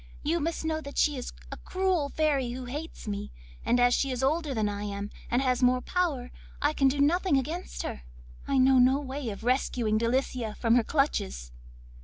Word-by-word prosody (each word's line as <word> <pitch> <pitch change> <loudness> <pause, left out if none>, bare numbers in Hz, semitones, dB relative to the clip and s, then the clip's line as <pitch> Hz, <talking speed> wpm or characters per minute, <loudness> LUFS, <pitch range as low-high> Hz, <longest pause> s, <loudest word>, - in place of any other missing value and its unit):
You 330 +3 +1
must 325 +1 -2
know 315 0 -1
that 280 -1 -9
she 295 - +3
is 250 - -5 0.2
a - - -6
cruel 370 -6 0
fairy 280 -6 0
who 255 0 -6
hates 295 +1 -7
me, 205 0 -4 0.3
and 245 - +2
as 245 0 +5
she 275 - +1
is 255 0 -2
older 305 +2 +1
than 220 -5 0
I 205 0 -3
am 200 0 -5 0.2
and 245 +3 +2
has 255 -1 +1
more 250 0 +4
power, 285 -5 -1 0.3
I 290 +1 +1
can 275 -3 +3
do 275 +2 +1
nothing 325 +2 +3
against 320 +8 -3
her. 65 - -5 0.5
I 275 - +1
know 260 0 +5
no 260 +3 +5
way 270 -2 -4
of 200 +1 -7
rescuing 240 -3 +1
Delicia 235 -2 -1
from 230 -1 +2
her 240 -1 +5
clutches. 65 - -1
260 Hz, 200 wpm, -28 LUFS, 240-295 Hz, 0.5 s, as